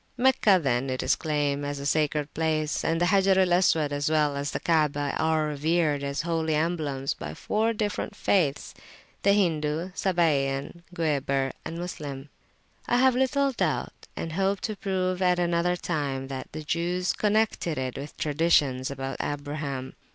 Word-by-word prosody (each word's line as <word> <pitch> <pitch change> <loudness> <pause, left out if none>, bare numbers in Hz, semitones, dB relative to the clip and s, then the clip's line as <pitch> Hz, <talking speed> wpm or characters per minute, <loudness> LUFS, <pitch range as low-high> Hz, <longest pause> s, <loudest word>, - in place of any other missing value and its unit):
Meccah, 245 -6 +4
then, 130 -3 0
is 130 0 +1
claimed 145 -2 -1
as 145 0 -3
a 140 - -6
sacred 150 0 0
place, 155 -1 0
and 165 0 +1
the 175 - +3
Hajar 190 +1 +4
al 185 -2 +4
Aswad, 160 -5 +3
as 145 +1 0
well 150 -2 +2
as 140 +1 -2
the - - -3
Kaabah, 150 -3 +1
are 160 -1 +2
revered 150 0 +1
as 140 +1 -2
holy 165 -2 0
emblems 150 -4 -1
by 75 +1 -7
four 220 - 0
different 210 -2 -3
faithsthe 160 -8 +1 0.5
Hindu, 170 -4 +1
Sabæan, 155 -5 0
Gueber, 140 -4 0
and 165 +1 -6
Moslem. 145 -5 -6 0.6
I 245 - +3
have 260 +1 +5
little 275 +2 +2
doubt, 245 - -2
and 165 - -4
hope 195 +2 +1
to 215 - -3
prove 185 -2 -1
at 180 -1 +3
another 175 0 +1
time, 140 -6 -3
that 135 -1 -6
the 155 0 -6
Jews 175 +3 0
connected 210 -6 0
it 130 -1 -3
with 145 +2 -8
traditions 145 -4 +2
about 135 -1 -5
Abraham. 145 -2 -4
155 Hz, 155 wpm, -27 LUFS, 145-180 Hz, 0.6 s, have